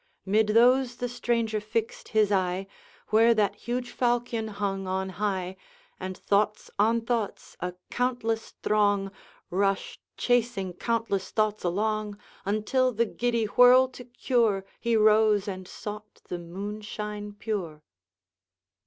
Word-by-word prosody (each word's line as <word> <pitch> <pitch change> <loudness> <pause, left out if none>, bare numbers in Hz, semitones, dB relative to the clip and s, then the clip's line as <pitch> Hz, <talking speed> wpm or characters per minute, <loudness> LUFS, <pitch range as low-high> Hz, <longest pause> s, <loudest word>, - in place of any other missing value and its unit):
Mid 210 +2 +3
those 245 +3 +4
the 245 - -3
stranger 230 -3 -1
fixed 460 - -3
his 215 -2 +2
eye 185 -1 +1 0.4
Where 225 +2 +5
that 205 -2 +2
huge 240 +3 -4
falchion 240 -2 0
hung 200 -2 -3
on 190 +1 -1
high, 190 -1 -2 0.4
And 185 0 -5
thoughts 210 +1 0
on 225 +3 +3
thoughts, 230 -2 -3
a 180 0 -4 0.2
countless 240 -3 -1
throng, 205 -2 +2 0.4
Rushed, 195 +1 0 0.2
chasing 235 -6 +1
countless 225 -1 -1
thoughts 215 -1 0
along, 210 +3 -1 0.3
Until, 215 +6 +1
the 235 0 +1
giddy 235 0 0
whirl 250 +4 +6
to 255 -1 -11
cure, 235 -5 +1
He 235 -1 +1
rose 215 -1 +4
and 185 -2 -5
sought 210 +1 -8
the 175 - -3
moonshine 210 +3 -6
pure. 190 -8 -4
215 Hz, 125 wpm, -27 LUFS, 195-235 Hz, 0.4 s, whirl